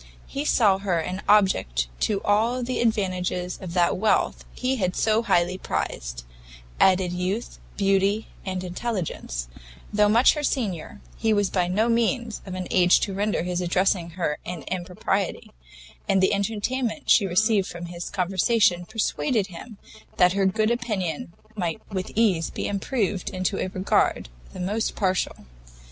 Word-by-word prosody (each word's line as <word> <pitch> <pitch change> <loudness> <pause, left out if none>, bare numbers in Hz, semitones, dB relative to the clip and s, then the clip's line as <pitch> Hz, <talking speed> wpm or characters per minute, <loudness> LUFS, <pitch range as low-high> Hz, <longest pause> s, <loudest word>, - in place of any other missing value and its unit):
He - - -7
here 290 - -1
saw 205 -5 +4
an 185 -1 -2
object 190 - +3
who - - -19
to 200 -2 -1
all 230 +5 +2
the 255 +1 -2
advantages 185 -5 -1
of 180 -2 -7
that 175 -1 +3
wealth 215 +3 +1
he 260 +1 -1
had 185 -4 -1
so 220 0 +2
highly 180 -4 +1
prized, - - -3 0.6
added 185 -1 +4
youth, 185 +6 -3 0.2
beauty, 195 +2 +2 0.2
and 185 -1 -3
intelligence; 180 - -4 0.5
though 210 0 +4
much 230 +4 +6
her 300 - -3
senior, 205 - -2 0.2
he 225 -1 +2
was 205 -2 +1
by 180 -2 +1
no 210 +6 +1
means 235 0 0
of 185 - -5
an 185 -1 -4
age 180 -1 +5
to 195 - -1
render 205 -2 0
his 180 0 -2
addressing 180 0 +1
her 150 -4 -1
an 175 -4 -6
impropriety, 185 +1 -2 0.6
and 195 -1 +4
the 190 +2 +3
entertainment 225 +6 -2
she 200 - +5
received 200 +2 +2
from 175 0 -7
his 175 0 -6
conversation, 185 0 +2
persuaded 215 -2 0
him 215 +5 -10 0.4
that 180 0 +5
her 195 -1 +2
good 215 +3 +1
opinion 195 -10 -2 0.2
might 175 -6 -2
with 185 -2 -3
ease 200 -7 +2
be - - -4
improved 200 -2 -1
into 185 +1 -2
a - - -1
regard 185 - +1 0.2
the - - -9
most 205 +5 -1
partial. 185 -2 -1
190 Hz, 155 wpm, -25 LUFS, 180-215 Hz, 0.6 s, much